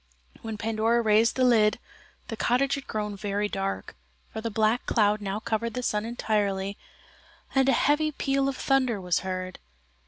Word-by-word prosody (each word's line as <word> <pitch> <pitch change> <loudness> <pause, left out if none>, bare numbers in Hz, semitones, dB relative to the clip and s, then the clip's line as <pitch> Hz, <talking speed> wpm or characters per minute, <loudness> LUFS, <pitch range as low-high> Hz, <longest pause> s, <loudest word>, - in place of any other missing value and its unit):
When 225 -1 -5
Pandora 225 +2 +1
raised 220 +1 +3
the 260 - +1
lid, 220 -4 +4 0.5
the 225 - -4
cottage 255 +5 +1
had 275 - -4
grown 210 -1 -3
very 205 +1 -2
dark, 195 -1 -4 0.4
for 220 - -4
the 230 - -2
black 220 +2 +1
cloud 210 -2 +2
now 200 +1 -3
covered 230 +1 -2
the 250 - -3
sun 210 -2 0
entirely 205 -4 -1 0.8
and 270 0 +3
a - - +5
heavy 305 +2 +2
peal 275 -1 0
of 270 - -4
thunder 260 -6 +1
was 180 -2 0
heard. 185 -1 -5
220 Hz, 165 wpm, -27 LUFS, 205-250 Hz, 0.8 s, a